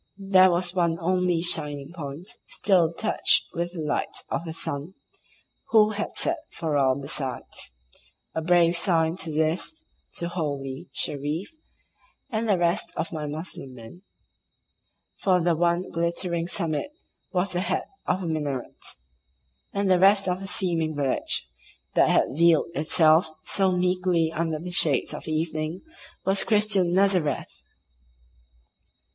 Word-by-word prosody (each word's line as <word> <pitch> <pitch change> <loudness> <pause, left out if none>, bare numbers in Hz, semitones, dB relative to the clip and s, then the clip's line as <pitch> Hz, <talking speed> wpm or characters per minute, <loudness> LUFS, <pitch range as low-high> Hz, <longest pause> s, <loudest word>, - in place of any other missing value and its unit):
There 190 -1 +5
was 175 0 0
one 170 -3 +1
only 180 -1 +1
shining 145 -4 +2
point 155 +1 -7 0.2
still 175 -5 +2
touched 215 +6 +3
with 175 +1 -3
the 170 - -5
light 150 -1 -2
of 170 - -2
the 165 - -5
sun, 150 +3 -4 0.7
who 215 -1 +5
had 210 0 -4
set 335 0 +1
for 160 -3 -3
all 135 -2 +3
besides; 135 - -4 0.6
a 160 - -2
brave 170 0 +3
sign 165 -2 +2
this 160 - -2 0.3
to 170 - -2
"holy" 140 -7 -4
Shereef 150 +7 -2 0.8
and 220 0 -1
the 200 - +4
rest 170 0 0
of 165 - -3
my 150 -2 -4
Moslem 145 -3 -6
men, 115 +9 -12 1.2
for 185 -2 +3
the 170 -1 +2
one 175 +2 0
glittering 170 0 -1
summit 165 - -2 0.4
was 185 0 0
the 175 - 0
head 185 0 -1 0.2
of 190 - 0
a - - -3
minaret, 145 -5 -4 0.9
and 200 0 -1
the 180 - +4
rest 195 +1 +5
of 180 0 0
the 195 - -7
seeming 165 -5 -1
village 140 -3 -1 0.5
that - - +4
had - - +3
veiled 165 +2 +3
itself 160 +1 +3 0.2
so 190 -1 +2
meekly 180 -2 +1
under 165 -1 -2
the 175 +3 -7
shades 155 -6 +3
of 150 - -8
evening 155 +1 -2 0.4
was 195 +1 +4
Christian 210 -5 +3
Nazareth! 185 -6 +1
170 Hz, 135 wpm, -25 LUFS, 155-185 Hz, 1.2 s, There